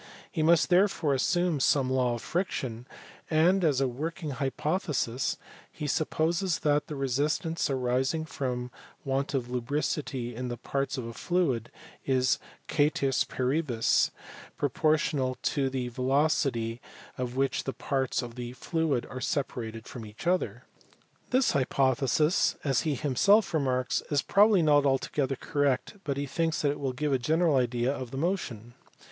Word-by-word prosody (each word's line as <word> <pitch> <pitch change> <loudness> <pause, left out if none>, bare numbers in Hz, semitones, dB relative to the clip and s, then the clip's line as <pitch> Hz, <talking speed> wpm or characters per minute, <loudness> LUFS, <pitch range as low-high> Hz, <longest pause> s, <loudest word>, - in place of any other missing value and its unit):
He 160 - -1
must 165 +1 +4
therefore 180 -5 +3
assume 175 +3 +1
some 135 0 +3
law 130 -2 +1
of 115 - -8
friction, 130 - -3 0.4
and 175 +4 +3
as 145 -5 +3
a 135 - +2
working 155 +5 -4
hypothesis 140 -2 -1 0.3
he 150 - -6
supposes 160 +4 0
that 145 0 +2
"the 150 - -5
resistance 145 +6 0
arising 130 +4 0
from 125 -5 -3 0.3
want 135 +1 -1
of 125 -2 -2
lubricity 125 -1 -2
in 125 +2 -4
the 120 -1 -4
parts 135 +3 -2
of 125 - -4
a 115 - -6
fluid 140 -9 0 0.3
is, 130 -2 +2 0.3
cater 145 -2 +2
is 135 - +1
paribus, 130 -2 +1 0.5
proportional 145 -2 +1
to 135 -2 +1
the 130 -2 -3
velocity 130 -2 0 0.4
with 125 -1 -3
which 135 +1 0
the 135 - -1
parts 135 -2 -1
of 120 -1 -7
the 120 0 -6
fluid 150 -1 -1
are 130 - -7
separated 115 -5 -3
from 120 - -8
each 105 +6 -10
other." 180 +1 0 0.7
This 255 0 +3
hypothesis, 135 +4 +2
as 135 -3 +2
he 155 -3 0
himself 185 - +3
remarks, 130 -4 +1
is 145 -2 +1
probably 205 -3 +5
not 145 -2 +5
altogether 135 0 0
correct, 145 - -1
but 140 -2 -2
he 140 - -1
thinks 160 +4 -1
that 145 - +3
it 145 - -5
will 135 -2 -1
give 145 +2 -1
a 130 - +2
general 160 +4 +2
idea 125 +1 +1
of 130 -3 -6
the 135 - -6
motion. 135 - -2
135 Hz, 150 wpm, -28 LUFS, 125-155 Hz, 0.7 s, probably